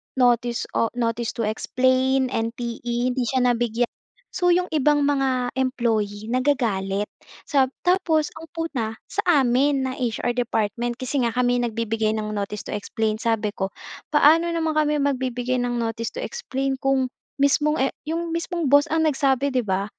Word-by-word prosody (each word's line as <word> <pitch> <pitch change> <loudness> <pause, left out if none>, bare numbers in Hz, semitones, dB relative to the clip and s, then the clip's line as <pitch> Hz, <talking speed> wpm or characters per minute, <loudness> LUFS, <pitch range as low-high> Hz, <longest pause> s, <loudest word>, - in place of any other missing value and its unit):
notice 240 -2 +2
o 230 - +1
notice 230 -1 -1
to 230 - -2
explain, 260 +4 +1
NTE, 235 +1 -2
hindi 255 0 -1
siya 260 +1 +1
nabigyan. 240 -1 +1 0.4
So 355 - 0
'yong 360 +1 +2
ibang 295 -1 +3
mga 265 -3 +1
employee 225 -5 0
nagagalit, 220 -7 0 0.4
sa 275 -3 +3 0.2
tapos 355 -4 +2
ang 325 - -10
puna 260 -10 -3 0.2
sa - - -4 0.2
amin, 265 +3 +2
na 260 - -2
HR 240 0 -1
department 240 0 -1
kasi 260 +2 -2
nga 230 - -4
kami 245 0 +2
'yong 240 -1 0
nagbibigay 225 -1 0
ng 215 -1 -3
notice 205 0 -4
to - - -6
explain. 215 +1 -2
Sabi 225 -2 0
ko, 190 - -2 0.4
"Paano 310 +3 +5
naman 325 -2 0
kami 300 0 +2
magbibigay 255 -2 -1
ng 245 0 -1
notice 230 0 -2
to - - -4
explain 270 - -3
kung 265 -2 +1 0.3
mismong 295 +2 +3
e 270 - +1 0.2
'yong 335 +1 -2
mismong 335 0 -2
boss 285 +2 +6
ang 320 +1 +2
nagsabi, 280 -2 +2
'di 255 - +2
ba? 190 +1 0
250 Hz, 160 wpm, -23 LUFS, 230-285 Hz, 0.4 s, boss